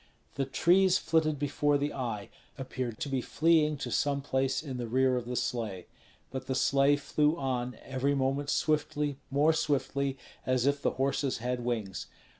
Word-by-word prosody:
The 135 - -1
trees 180 +7 +4
flitted 155 -2 +1
before 145 +1 +1
the 145 +1 -2
eye, 115 -6 -4 0.3
appeared 130 -4 -4
to - - -1
be 135 -2 -1
fleeing 155 +1 +2
to 145 - -5
some 140 -1 +1
place 135 0 0
in 135 -5 -5
the 120 -1 -3
rear 130 +2 +2
of 125 -1 -2
the 125 - -3
sleigh; 110 -7 -2 0.5
but 130 0 -5
the 130 - -1
sleigh 140 +2 +4
flew 150 +2 +1
on, 125 -3 -2
every 135 +2 0
moment 135 +1 0
swiftly, 150 -2 0
more 145 +4 +3
swiftly, 140 -3 0 0.3
as 130 -1 +1
if 140 0 +2
the - - +1
horses 135 0 0
had 125 +1 -2
wings. 110 -6 -3
135 Hz, 170 wpm, -30 LUFS, 125-145 Hz, 0.5 s, trees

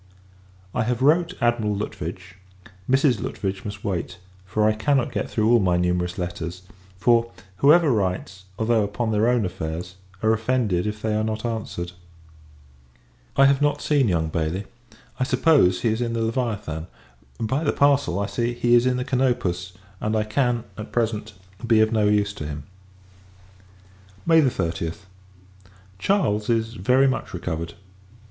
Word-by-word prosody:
I - - 0
have 125 +1 -1
wrote 170 +5 +3
Admiral 120 -3 +1
Lutwidge; 90 -2 -6 0.6
Mrs. 130 -4 +3
Lutwidge 95 -1 -4
must 105 0 -7
wait, 95 -5 -3 0.3
for 105 +3 +2
I 110 - +3
cannot 130 +4 +1
get - - -3
through 110 +1 +2
all 120 - +6
my 90 -3 +2
numerous 90 0 0
letters: 90 0 -5 0.3
for, 115 +3 +3 0.3
whoever 150 - +5
writes, 95 -3 -2
although 110 -1 +2
upon 105 +3 -2
their 110 +2 +2
own 120 -4 +2
affairs, 90 0 -5 0.3
are 110 0 +4
offended 110 -5 0
if 105 0 -5
they 110 -1 0
are 110 0 +1
not 110 +1 -3
answered. 110 -6 -4 1.5
I 135 - +7
have 140 0 +3
not 145 0 +2
seen 145 -5 +2
young 80 -4 0
Bailey: 80 +5 -2 0.5
I - - +2
suppose, 125 - +3
he 115 - +2
is 110 +2 -1
in 120 -1 -1
the 115 -1 -1
Leviathan. 110 -9 -2 0.5
By 130 +7 -1
the 145 - +2
parcel, 140 -11 +2
I 100 - 0
see, 120 +2 -2
he 120 0 +2
is 120 +1 +5
in 125 0 +1
the 125 - -2
Canopus; 120 -10 0 0.3
and 110 +1 -1
I 110 - +2
can, 120 +1 0 0.2
at 110 - -7
present, 110 -2 -1 0.3
be 115 -2 +5
of 110 0 +4
no 110 -2 +2
use 105 -1 +2
to 75 -7 -6
him. 75 -1 -6 1.6
May 165 -1 +6
30th. 85 - -1 1.0
Charles 110 - +1
is 115 -1 +1
very 125 +6 +3
much 130 - -2
recovered. 85 -1 -4
110 Hz, 155 wpm, -23 LUFS, 90-125 Hz, 1.6 s, I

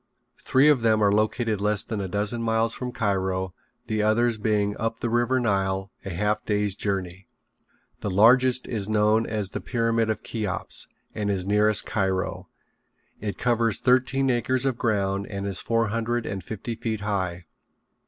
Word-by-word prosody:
Three 135 +3 +4
of 145 -5 +4
them 110 -2 +3
are 100 - +4
located 110 0 0
less 105 0 +1
than 110 -3 -4
a 95 - -3
dozen 105 +5 -1
miles 115 0 +1
from 125 +1 -4
Cairo, 95 -4 -1 0.3
the 110 -1 -1
others 110 +1 +2
being 105 -1 +1
up 115 0 -2
the 120 - -2
river 120 +2 +2
Nile 95 -4 0
a - - -5
half 105 +4 -1
day's 105 -2 0
journey. 95 -2 -3 0.7
The - - -3
largest 125 +6 +5
is 105 -3 -3
known 110 +1 +3
as 105 -3 -2
the - - -4
Pyramid 115 -2 0
of 110 - -2
Cheops 105 -5 -3 0.3
and 105 -1 -2
is 95 -2 -1
nearest 105 +1 +3
Cairo. 95 -4 -2 0.7
It 100 -3 -4
covers 115 -3 +1
thirteen 130 +1 +2
acres 125 +2 0
of 135 -3 +1
ground 100 -4 0
and 100 -1 -5
is 100 -2 -2
four 115 -1 +1
hundred 115 +2 -1
and 95 -3 -4
fifty 110 +4 -5
feet 110 -2 -3
high. 95 -4 -2
110 Hz, 165 wpm, -25 LUFS, 100-115 Hz, 0.7 s, largest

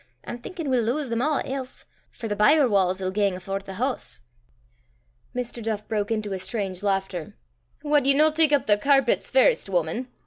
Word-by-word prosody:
I'm 240 - -6
thinkin' 330 +5 -7
we'll 245 -3 +2
lowse 265 +4 -1
them 230 0 -1
a' 300 +1 +1
else; 265 -1 -6 0.2
for 225 - -7
the 205 - -2
byre 280 +7 +4
wa's 190 -3 +1
'll 185 0 -2
gang 200 -1 0
afore 195 +2 -4
the 195 -1 -10
hoose." 255 +5 -2 1.1
Mr. 245 -1 -4
Duff 215 -1 -3
broke 210 -2 -2
into 215 -3 -2
a 190 - -3
strange 190 -1 -3
laughter. 195 -2 -2 0.5
"Wad 295 -2 +2
ye 275 - +7
no 310 +2 +5
tak 310 -1 +4
up 285 -4 +3
the 205 -1 +4
carpets 275 +3 +2
first, - - +3
wuman?" 180 +7 -1
225 Hz, 185 wpm, -24 LUFS, 195-275 Hz, 1.1 s, ye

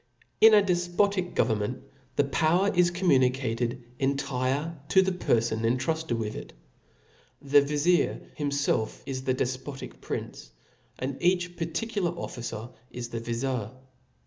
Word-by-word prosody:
TN 220 -1 +9
a 205 - +5
defpotic 180 +1 +1
government 110 +2 0 0.3
the 145 - +4
power 165 +7 +2
is 175 -1 +4
cbmfnu* 175 -6 +3
•■• 125 -1 +4
nicated 120 -1 -2 0.2
entire 140 +3 -1
to 190 - +6
the 190 - 0
perfon 115 -10 0
intruded 155 +6 0
with 110 -2 -3
it. - - -8 0.9
The 145 0 +5
vizir 150 +5 +2 0.2
himfclf 140 -6 -1
is 130 -1 -5
the 130 - +1
defpotic 130 +2 -4
prince; - - -6 0.5
and 135 +1 -4
each 180 0 +1
particular 180 +3 -2
officer 115 -5 -5 0.2
is 120 -1 -6
the 115 - -4
vizir. 120 0 -2
140 Hz, 130 wpm, -27 LUFS, 125-175 Hz, 0.9 s, TN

